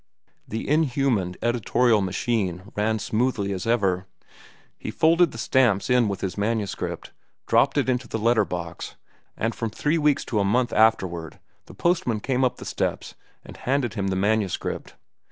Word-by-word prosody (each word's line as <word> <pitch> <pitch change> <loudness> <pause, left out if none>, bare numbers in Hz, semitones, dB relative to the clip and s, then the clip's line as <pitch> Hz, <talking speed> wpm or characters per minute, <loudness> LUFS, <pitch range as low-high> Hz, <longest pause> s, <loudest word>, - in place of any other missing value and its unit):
The 110 - -4
inhuman 135 - +1
editorial 120 -1 +2
machine 95 -1 -2
ran 110 +1 +1
smoothly 110 -2 -1
as 95 +2 -5
ever. 95 -5 +1 0.7
He - - -5
folded 165 +1 +4
the 115 - -10
stamps 120 -3 +2
in 125 -2 +4
with 100 -2 -3
his 95 +1 -3
manuscript, 105 -1 -2 0.3
dropped - - +3
it - - +2
into 125 -1 0
the - - -3
letter 115 +1 +3
box, 85 -1 -6 0.4
and 115 +1 -1
from 115 0 -3
three 150 +9 0
weeks 150 -2 +2
to 110 - -1
a - - +2
month 120 +5 +1
afterward 95 -7 +1 0.3
the - - -13
postman 170 - +1
came 130 +3 0
up 125 - +1
the - - -9
steps - - -3 0.3
and - - -11
handed 130 -3 -1
him 100 -3 -2
the 95 - 0
manuscript. 100 0 -1
110 Hz, 160 wpm, -24 LUFS, 100-125 Hz, 0.7 s, folded